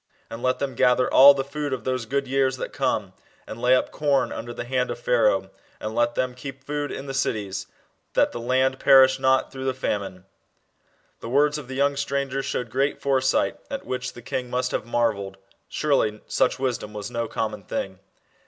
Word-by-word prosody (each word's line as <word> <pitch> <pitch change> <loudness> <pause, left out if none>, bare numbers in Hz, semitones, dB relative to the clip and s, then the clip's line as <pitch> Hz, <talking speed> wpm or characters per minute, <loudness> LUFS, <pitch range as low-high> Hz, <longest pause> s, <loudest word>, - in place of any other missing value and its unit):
And 115 - -7
let 130 0 +1
them 140 -2 -3
gather 125 +1 +3
all 140 +1 +9
the 135 - -1
food 145 0 -4
of 130 - -4
those 130 -3 -2
good 140 +2 -1
years 135 0 +1
that - - -5
come, 110 -8 -1 0.3
and 115 - -8
lay 125 +1 +5
up - - 0
corn 145 -2 +1
under 120 - -6
the 120 - -5
hand 125 +1 -1
of - - -3
Pharaoh, - - +2 0.3
and 110 0 -5
let 120 +1 +1
them 130 -1 -1
keep 135 +1 -9
food 145 +1 -3
in 135 - -6
the 135 - -5
cities.... 105 -7 -2 0.5
That - - +3
the - - -6
land 130 +2 +1
perish 130 -1 +6
not 130 0 +2
through 130 0 -6
the 130 -1 0
famine/' 100 -7 -3 0.9
The 115 - -7
words 145 +3 +2
of 140 - -10
the 130 - -6
young 140 +1 +2
stranger 140 -1 -1
showed 125 -3 -3
great 135 +2 0
foresight, 130 -1 +1
at - - -5
which 125 0 -4
the 120 - -12
king 125 +1 -3
must 125 +1 -1
have 110 - -3
marvelled. 105 -5 -1 0.3
Surely 135 -8 0
such - - +1
wisdom 125 -5 -3
was 105 +2 -6
no 115 -1 -2
common 110 -2 -3
thing. 95 0 -5
130 Hz, 200 wpm, -24 LUFS, 120-135 Hz, 0.9 s, all